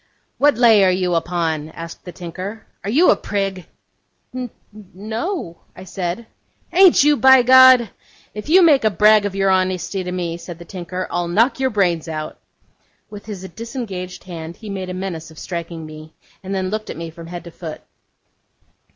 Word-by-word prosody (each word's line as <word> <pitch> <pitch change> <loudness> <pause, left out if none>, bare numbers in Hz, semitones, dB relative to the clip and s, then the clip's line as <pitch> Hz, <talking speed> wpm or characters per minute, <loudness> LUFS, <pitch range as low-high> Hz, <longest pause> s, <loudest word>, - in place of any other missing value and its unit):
'What 290 -4 +4
lay 225 -4 +6
are 190 - +5
you 180 -1 0
upon?' 165 -2 -1
asked 165 +1 -10
the 180 - -7
tinker. 185 +6 -7 0.2
'Are 200 - -3
you 310 +11 +5
a - - +4
prig?' 195 -3 -3 0.7
'N 255 -1 -4 0.5
no,' 220 - -4 0.2
I - - -10
said. 185 +3 -4 0.5
'Ain't 370 -4 +6
you, 295 0 +5
by 265 0 +6
G? 255 -3 +7 0.4
If 210 +7 -8
you 365 +3 +6
make 295 -7 +5
a 215 - +4
brag 210 +1 +4
of 195 - -7
your 195 0 +2
honesty 185 0 0
to 180 - -5
me,' 175 -2 -3
said 175 -1 -9
the 170 - -12
tinker, 185 +1 -5
'I'll 175 0 -1
knock 230 +10 +2
your 265 -1 +1
brains 180 -7 0
out.' 155 -1 -6 0.7
With 205 0 -10
his 190 -3 -7
disengaged 215 -5 -7
hand 170 -2 -8
he 215 +2 -9
made 190 -2 -5
a 180 - -5
menace 180 -4 -5
of 160 - -16
striking 170 -2 -6
me, 155 0 -12 0.3
and 195 0 -5
then 190 0 -2
looked 215 0 -4
at - - -6
me 165 0 -6
from 165 +1 -11
head 175 0 -7
to 170 - -11
foot. 160 -2 -8
185 Hz, 185 wpm, -20 LUFS, 170-220 Hz, 0.7 s, G